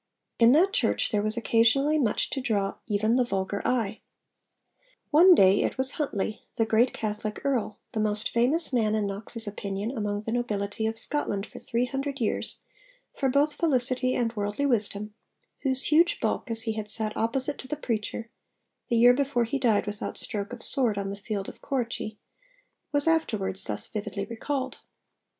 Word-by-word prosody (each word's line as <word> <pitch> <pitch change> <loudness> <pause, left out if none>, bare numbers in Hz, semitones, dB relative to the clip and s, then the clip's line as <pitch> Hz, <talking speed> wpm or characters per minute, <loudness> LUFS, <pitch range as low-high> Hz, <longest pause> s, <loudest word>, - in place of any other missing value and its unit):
In 230 0 +7
that 370 +7 +4
church - - +1
there 210 - +1
was 215 +2 -1
occasionally 240 +7 +3
much 230 -7 0
to 270 - -2
draw 205 -6 -1
even 215 +3 +1
the 255 - +4
vulgar 195 -3 -2
eye. 225 -4 -1 1.1
One 350 +5 +8
day 190 - +5
it - - -1
was 260 +1 +1
Huntly, 220 -8 -3
the 225 - +2
great 225 +3 +3
Catholic 215 0 -4
Earl, 250 -6 -1
the 220 - -3
most 215 0 0
famous 270 +7 +4
man 220 -3 +2
in 215 -1 0
Knox's 215 +3 -3
opinion 205 +3 -4
among 205 -2 -2
the 225 - -5
nobility 220 -3 -2
of 225 0 -3
Scotland 210 -8 -1
for - - -12
three 235 +2 -1
hundred 275 +2 -4
years 225 - -2 0.5
for 270 - 0
'both 285 +3 +2
felicity 255 -4 +1
and 235 -1 -1
worldly 205 +6 -2
wisdom,' 210 -4 -1 0.5
whose 265 -1 -1
huge 330 +3 +3
bulk - - -2
as 225 -1 +1
he 225 - -1
had 215 -1 -5
sat 215 0 +3
opposite 260 +5 +1
to 260 - -8
the 300 - -3
preacher 230 -1 -3 0.6
(the 235 - +1
year 245 +2 +7
before 275 -2 +1
he 255 +5 -2
died 225 -5 +2
'without 205 0 -5
stroke 205 0 -3
of 245 -1 -8
sword' 245 -7 +2
on 195 0 -3
the - - -4
field 200 -1 -4
of - - -11
Corrichie) 235 -5 -3 0.7
was 290 +1 +4
afterwards, 205 - +1
thus - - -2
vividly 205 -2 -5
recalled. 260 +4 -4
230 Hz, 175 wpm, -27 LUFS, 210-265 Hz, 1.1 s, One